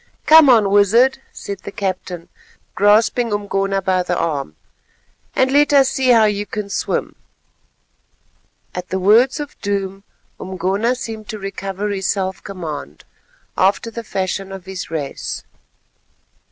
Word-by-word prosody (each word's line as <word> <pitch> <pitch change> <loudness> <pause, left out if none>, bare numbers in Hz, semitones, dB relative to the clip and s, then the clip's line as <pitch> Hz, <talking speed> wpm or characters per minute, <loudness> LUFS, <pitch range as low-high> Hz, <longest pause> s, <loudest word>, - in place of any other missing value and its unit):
"Come 315 -2 +8
on, 220 -5 +5
Wizard," 230 +7 +4
said 200 -2 -7
the 200 - -8
captain, 185 -4 -4 0.5
grasping 220 +3 +3
Umgona 195 -1 -1
by 185 -1 +1
the 180 0 -2
arm, 140 - -2 0.8
"and 260 0 +2
let 290 +1 +4
us 270 -2 +6
see 260 -1 0
how 230 -3 +6
you 205 0 -1
can 205 0 -5
swim." - - -2 1.6
At 180 0 -6
the 190 - -1
words 225 +9 +4
of 295 -1 -8
doom 195 -1 -3 0.4
Umgona 190 +6 -1
seemed 220 -4 -7
to 215 - -4
recover 195 0 -4
his 195 -2 -2
self 190 -1 -2
command, 155 - -7 0.5
after 200 +4 +1
the 230 +1 -6
fashion 195 -1 -3
of 195 -2 -8
his 190 -1 -6
race. 150 -4 -4
200 Hz, 135 wpm, -19 LUFS, 190-225 Hz, 1.6 s, Come